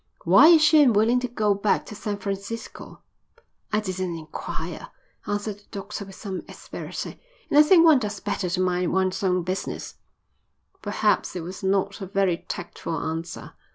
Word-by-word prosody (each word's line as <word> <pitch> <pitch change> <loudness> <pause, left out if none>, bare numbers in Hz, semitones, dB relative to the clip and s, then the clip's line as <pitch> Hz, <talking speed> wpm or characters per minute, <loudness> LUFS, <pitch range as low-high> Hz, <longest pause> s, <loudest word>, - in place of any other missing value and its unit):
"Why - - +7
is 325 -2 +7
she 310 0 +6
unwilling 235 -2 +4
to 250 - -2
go 215 -4 +1
back 200 +1 0
to - - -9
San 205 0 -4
Francisco?" 200 +3 -6 0.7
"I 210 - +2
didn't 185 -3 -3
enquire," 160 - -6 0.4
answered 205 0 -2
the 205 - -23
doctor 200 +1 -6
with 195 -1 -12
some 190 -3 -5
asperity. - - -7 0.3
"And 290 - +6
I - - +11
think 330 +2 +6
one 310 -5 +7
does 210 -3 -4
better 200 -3 -2
to 180 - -1
mind 180 -1 0
one's 190 +1 0
own 180 -2 +1
business." 185 +2 -4 0.8
Perhaps 210 -1 0
it 175 - -4
was 180 +3 -7
not 195 +1 0
a 190 - -5
very 195 -2 +1
tactful 170 -1 -5
answer. 165 +1 -5
200 Hz, 165 wpm, -25 LUFS, 185-215 Hz, 0.8 s, I